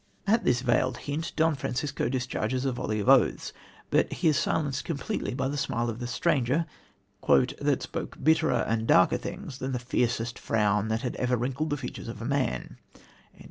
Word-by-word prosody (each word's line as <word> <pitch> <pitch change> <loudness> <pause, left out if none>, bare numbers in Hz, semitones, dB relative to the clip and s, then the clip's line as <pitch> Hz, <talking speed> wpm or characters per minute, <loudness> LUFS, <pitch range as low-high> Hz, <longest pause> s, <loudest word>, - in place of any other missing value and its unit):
'" - - -38
At 220 +3 +3
this 125 0 +3
veiled 125 0 +1
hint 155 +4 -3
Don 160 0 +3
Francisco 140 0 -2
discharges 130 0 -2
a 135 - +1
volley 110 -3 -2
of 105 - -3
oaths, 135 -2 +4 0.4
but - - +3
he 170 - +2
is 150 - +2
silenced 140 -1 0
completely 140 -5 -3
by 130 0 -1
the 145 +1 -2
smile 120 -3 -1
of 110 - -8
the 120 - -4
stranger 140 +3 +1 0.6
"that - - +2
spoke - - -5
bitterer 160 -5 +3
and 115 0 0
darker 90 - +5
things 130 - -7
than 130 0 -3
the - - 0
fiercest 120 -1 -1
frown 105 -1 +1
that 110 +3 -1
ever 125 0 +1
wrinkled 135 +6 -2
the 145 - -1
features 125 -3 -7
of 115 -2 -6
man." 140 -1 -1
130 Hz, 180 wpm, -28 LUFS, 120-145 Hz, 0.6 s, darker